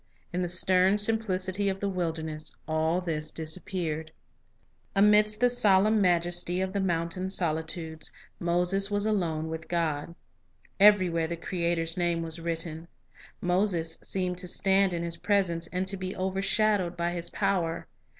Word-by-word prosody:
In 180 - -1
the 175 - -1
stern 185 +2 +3
simplicity 205 -3 0
of 190 0 -3
the 200 - -1
wilderness, 160 -4 -3
all 160 +3 +1
this 155 -3 -3
disappeared. 160 -1 -3 0.8
Amidst 210 +1 +4
the 245 - +5
solemn 215 -2 +4
majesty 175 0 +1
of 190 0 -2
the 200 - 0
mountain 175 +1 -1
soli 165 -4 +3
.\ionc 160 - -15
tudes, 160 -2 -5 0.3
Moses 180 +3 +2
was 205 0 0
alone 170 -7 0
with 160 0 -6
God. 165 -1 -2 0.6
Everywhere 185 -5 +5
the 170 +1 -4
Creator's 170 -1 -2
name 170 -1 0
was 165 0 -3
written. 165 0 -4 0.5
Moses 180 -3 0
seemed 180 -2 -2
to 180 - -3
stand 195 +1 +2
in 170 -1 -2
His 170 0 -2
presence, 170 -5 +1
and 180 +2 -2
to 195 +1 -1
be 185 +1 -5
overshadowed 190 -1 0
by 170 0 0
His 170 -1 -4
power. 180 -5 -1
180 Hz, 150 wpm, -28 LUFS, 165-195 Hz, 0.8 s, the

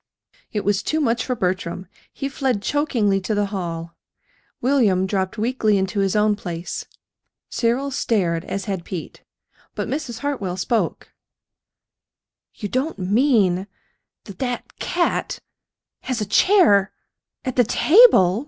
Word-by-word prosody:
It 210 - -3
was 205 0 +2
too 310 +8 -1
much 235 -5 +1
for 250 - -2
Bertram. 185 -2 -2 0.3
He 275 - -4
fled 260 -6 -1
chokingly 225 -8 +1
to 210 +3 -2
the 205 0 +1
hall. 170 -3 -4 0.7
William 230 -8 +2
dropped 190 +1 -2
weakly 220 -2 +1
into 190 +2 -1
his 195 0 +1
own 210 0 +3
place. 175 -3 -6 0.6
Cyril 255 +4 0
stared 180 -10 0
as 195 0 -4
had 195 -4 -3
Pete; 175 -2 -7 0.5
but - - -3
Mrs. 265 -6 -4
Hartwell 205 -11 -2
spoke. 225 +4 -2 1.4
"You 205 - -5
don't 260 +9 -2
mean 200 -2 +2 0.6
that 200 - -12
that 245 -2 -4
cat 345 0 -1 0.6
has 255 -3 -3
a 210 - -1
chair 205 - +4 0.5
at 255 - -2
the 245 - +5
table!" 240 - +5
210 Hz, 130 wpm, -22 LUFS, 190-255 Hz, 1.4 s, the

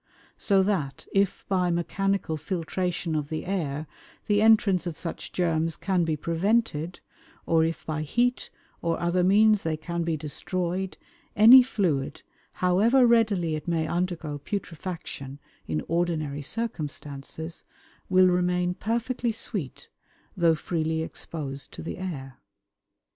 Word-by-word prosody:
So 195 -2 +3
that 175 -9 -1
if 195 -1 +1
by 180 -2 +1
mechanical 190 0 0
filtration 170 +2 -2
of 150 -2 -2
the 155 +2 -4
air 155 -6 -2 0.4
the 205 0 +2
entrance 210 -5 +4
of 165 - -5
such 165 - -6
germs 165 -2 0
can 180 -1 +1
be 160 -1 0
prevented, 170 0 0 0.4
or 165 -1 +3
if 165 0 -2
by 155 -1 -2
heat 240 +11 0 0.3
or 165 -1 0
other 175 +1 +1
means 210 +2 +5
they 160 -1 -1
can 170 +2 -4
be 165 -1 -1
destroyed, 180 +5 -3 0.4
any 235 +5 +10
fluid, 175 - -1 0.4
however 225 +8 +5
readily 215 -8 +3
it 155 +1 -4
may 165 -2 +1
undergo 170 -4 -2
putrefaction 165 -6 -5 0.3
in 75 -1 -1
ordinary 160 -4 -1
circumstances, 160 - -5 0.5
will 185 0 +6
remain 180 0 +2
perfectly 235 +4 -1
sweet, 200 - -5 0.5
though 170 -3 +4
freely 160 0 -1
exposed 140 -4 -6
to - - -8
the 165 - -6
air. 135 -9 -6
175 Hz, 125 wpm, -26 LUFS, 155-195 Hz, 0.5 s, any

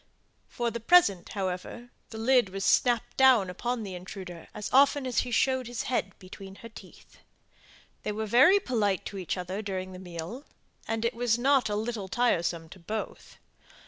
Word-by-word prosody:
For 240 -1 -2
the 235 - -4
present, 220 - +4
however, 190 +6 -4 0.2
the 220 - -8
lid 245 -1 +3
was 195 +1 -4
snapped 240 -2 +2
down 250 -8 +5
upon 240 +4 -3
the 195 -2 -6
intruder 180 -1 -9
as 210 - -6
often 275 +1 +5
as 250 -2 0
he 250 - -2
showed 260 +1 +1
his 240 -1 -4
head 235 -6 -2
between 190 +1 -11
her - - -8
teeth. 225 - -15 0.8
They - - -3
were 220 +1 -3
very 265 - +6
polite 215 - -1
to 200 - -6
each 185 +1 -3
other 185 +3 -4
during 185 -2 -4
the 185 - -9
meal; 180 - -7 0.4
and 225 0 -2
it 235 - 0
was 235 -1 +1
not 265 -2 +3
a 205 - -1
little 215 -2 -3
tiresome 175 -6 0
to 190 - -13
both. 215 +6 -6
220 Hz, 175 wpm, -28 LUFS, 190-245 Hz, 0.8 s, very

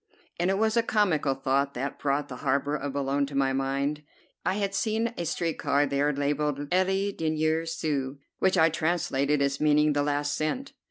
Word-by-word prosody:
And 175 +2 +2
it 195 - +1
was 220 +1 +2
a 235 - +5
comical 180 -11 +1
thought 135 +1 0
that 135 +3 -4
brought 145 +1 0
the 125 - -7
harbor 140 +2 0
of 140 -1 -4
Boulogne 140 0 0
to 140 - -8
my 135 -1 +2
mind. 140 +2 -1 0.4
I 190 - 0
had 200 -1 -1
seen 220 +3 0
a 175 - -3
street 165 0 -2
car 145 +1 +2
there, 140 +1 +1
labelled 145 +1 -1
"Le 190 +2 +2
Dernier 160 -1 0
Sou," 140 -4 -2 0.2
which 190 0 +2
I 160 0 +6
translated 155 -4 0
as 140 0 -1
meaning 150 0 +4
"The 145 - +1
Last 145 0 0
Cent." 260 - -2
150 Hz, 185 wpm, -27 LUFS, 140-175 Hz, 0.4 s, I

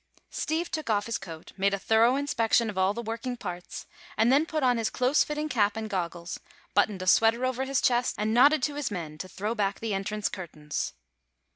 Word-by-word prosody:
Steve 330 +2 -2
took 310 -6 -3
off 205 -2 +1
his 230 - -2
coat, 165 -4 -10
made 200 +1 +2
a - - -4
thorough 225 +5 +3
inspection 235 -5 +1
of - - -13
all 190 +1 +3
the 235 +3 -5
working 230 +3 -4
parts, 180 -5 -7 0.3
and 225 +3 +4
then 295 +4 +4
put 310 -3 -2
on 245 -2 +3
his 225 - 0
close 255 +4 +2
fitting 300 0 -3
cap 215 -6 +1
and 220 -1 -4
goggles, 175 -2 -3 0.3
buttoned 205 -2 +1
a - - -5
sweater 225 +6 +4
over 260 +1 -1
his 270 -1 +1
chest 245 0 +2
and 215 +1 0
nodded 285 +4 +5
to 290 - 0
his 290 -3 -2
men 160 -6 -6
to 185 - -5
throw 205 +4 -3
back 200 -3 -1
the 225 -2 -2
entrance 200 +2 -2
curtains. 155 -5 -5
225 Hz, 215 wpm, -28 LUFS, 195-255 Hz, 0.3 s, nodded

